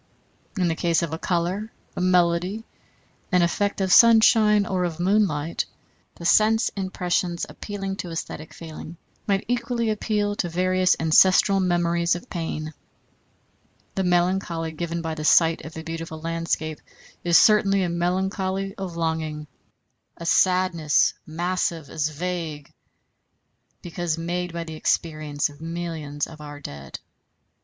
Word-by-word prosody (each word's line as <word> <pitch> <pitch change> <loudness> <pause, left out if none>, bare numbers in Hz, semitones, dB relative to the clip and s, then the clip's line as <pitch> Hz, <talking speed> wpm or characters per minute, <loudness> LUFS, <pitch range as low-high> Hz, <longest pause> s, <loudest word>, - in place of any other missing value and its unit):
In 180 -2 +2
the 165 - +1
case 170 +1 +1
of 160 -2 -3
a 160 - -4
color, 185 +6 -1 0.2
a - - -3
melody, 180 +3 +2 0.7
an 180 -2 +4
effect 200 +4 0
of 190 -1 +2
sunshine 220 -2 +6
or 185 -2 -1
of 170 -2 -3
moonlight, 175 -5 +1 0.5
the 170 - -9
sense 215 +5 +4
impressions 180 -2 -2
appealing 195 -2 -5
to 180 - -5
æsthetic 160 -2 -6
feeling 165 +1 -9 0.3
might 195 -1 +1
equally 235 -1 0
appeal 210 -1 -1
to 175 - -1
various 185 +2 +2
ancestral 185 +4 +5
memories 170 -2 +1
of 175 - -9
pain. 155 -2 -4 1.2
The 190 - -1
melancholy 175 -2 0
given 170 +1 -4
by 160 -1 -2
the 155 -1 -5
sight 165 +1 +4
of 160 +1 -9
a 160 - -6
beautiful 165 -1 -6
landscape 165 -1 -3 0.4
is 170 -1 +5
certainly 200 -3 +4
a 180 - -1
melancholy 190 +2 -1
of 180 -3 -5
longing, 160 -2 -2 0.7
a 170 - -8
sadness 180 -4 +3
massive 170 -2 -2
as 155 -1 -1
vague, 160 -2 -5 1.1
because 175 -1 -3
made 175 +1 -3
by 170 0 -4
the 160 -1 -8
experience 155 -2 -1
of 145 +1 -15
millions 165 -3 -4
of 155 -2 -12
our 145 -1 -9
dead. 70 - -8
175 Hz, 135 wpm, -24 LUFS, 160-190 Hz, 1.2 s, sunshine